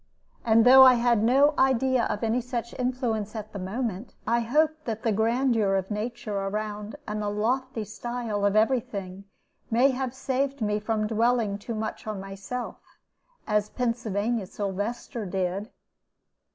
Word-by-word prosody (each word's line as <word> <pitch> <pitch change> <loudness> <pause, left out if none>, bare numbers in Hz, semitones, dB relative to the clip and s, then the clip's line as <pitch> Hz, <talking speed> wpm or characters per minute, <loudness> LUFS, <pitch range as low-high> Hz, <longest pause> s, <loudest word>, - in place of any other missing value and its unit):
And 225 0 +4
though 260 +1 +9
I 255 -1 +8
had 235 -2 +2
no 275 +6 +4
idea 260 -1 +3
of 210 +1 -3
any 225 +2 +1
such 235 -1 -4
influence 240 -4 -1
at 215 0 -7
the 200 - -5
moment, 210 +2 -4
I 235 +2 +2
hope 300 +7 +2
that 225 -2 -4
the 225 - +2
grandeur 225 -1 +2
of 190 +1 -2
nature 210 0 -4
around 210 +2 -3
and 210 0 -3
the 205 - -1
lofty 235 +3 -1
style 225 -1 -4
of 200 0 +2
every 225 +4 +4
thing 195 -3 -8 0.4
may 245 +4 +4
have 260 -1 -3
saved 270 +1 -1
me 210 -2 0
from 215 0 -1
dwelling 225 -2 +1
too 225 +3 -5
much 220 0 -5
on 215 -2 -3
myself, 195 +6 -6 0.7
as 210 -1 +1
Pennsylvania 230 -3 -1
Sylvester 205 +4 -4
did. 190 +3 -2
225 Hz, 150 wpm, -26 LUFS, 210-245 Hz, 0.7 s, though